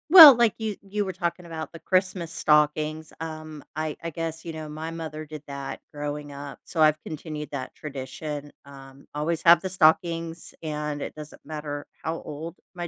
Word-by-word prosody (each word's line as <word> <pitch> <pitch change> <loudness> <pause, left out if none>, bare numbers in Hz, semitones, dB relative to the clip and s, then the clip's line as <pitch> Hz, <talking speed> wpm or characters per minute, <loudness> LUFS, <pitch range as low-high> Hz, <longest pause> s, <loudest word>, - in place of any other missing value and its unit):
Well, 315 -6 +13
like 235 -2 +3
you 220 -2 -2
you 205 +1 -2
were 190 - -3
talking 175 0 -2
about 160 -2 -6
the 165 - -10
Christmas 185 -1 +1
stockings, 150 0 +2
um, 155 -2 -6
I 155 -1 -2
I 165 - -2
guess, 165 0 -4
you 165 - -5
know, 155 -1 -6
my 155 +2 -5
mother 155 -2 -5
did 155 -1 -9
that 140 -1 -5
growing 145 0 -4
up, 140 0 -8
so 165 - -2
I've 155 0 +5
continued 155 -1 -6
that 130 -3 -5
tradition. 145 +1 -6
Um, 135 -1 -13
always 155 +2 -1
have 170 0 +8
the 190 - -3
stockings 165 -1 +2
and 150 -1 -3
it - - -5
doesn't 150 -1 -10
matter 150 -2 -5 0.2
how 165 +1 -2
old 160 +3 -6 0.2
my 175 -1 -3
155 Hz, 180 wpm, -26 LUFS, 150-170 Hz, 0.2 s, Well